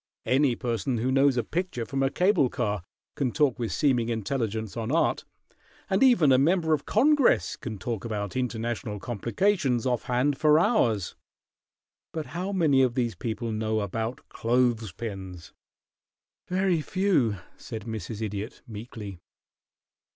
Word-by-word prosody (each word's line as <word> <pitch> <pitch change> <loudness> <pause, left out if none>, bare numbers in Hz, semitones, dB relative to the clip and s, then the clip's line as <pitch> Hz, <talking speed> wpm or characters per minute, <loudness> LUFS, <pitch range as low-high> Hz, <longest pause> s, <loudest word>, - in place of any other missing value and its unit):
Any 130 -1 +3
person 120 +2 -2
who 125 +4 0
knows 135 0 +4
a 120 - +2
picture 170 -9 -3
from 135 +3 -2
a 135 - +3
cable 180 -3 +3
car 105 -7 -2 0.3
can 130 -4 -1
talk 140 -3 +1
with 115 -2 -2
seeming 125 -5 +1
intelligence 110 -2 -2
on 115 +1 -3
art, 165 - +1 0.7
and - - +2
even 240 - +5
a 130 - +5
member 160 +2 +3
of 150 - -1
Congress 280 +4 +3
can 110 -4 -6
talk 110 +2 -4
about 105 -4 -4
international 120 -3 -3
complications 125 - 0
off 125 -2 0
hand 135 +2 +1
for 150 -1 +5
hours; 125 - +2 1.0
but 160 -2 -3
how 185 +4 -3
many 155 -8 +3
of 125 -2 +2
these 120 -3 0
people 115 0 -4
know 110 0 -1
about 110 +5 -4
clothes 120 -3 +1
pins?" 95 -5 -7 0.9
"Very 185 -2 +1
few," 160 - +1 0.2
said 110 -3 -7
Mrs. 110 -1 -5
Idiot, 105 +2 -5
meekly. 105 -4 -8
120 Hz, 145 wpm, -27 LUFS, 110-145 Hz, 1.0 s, even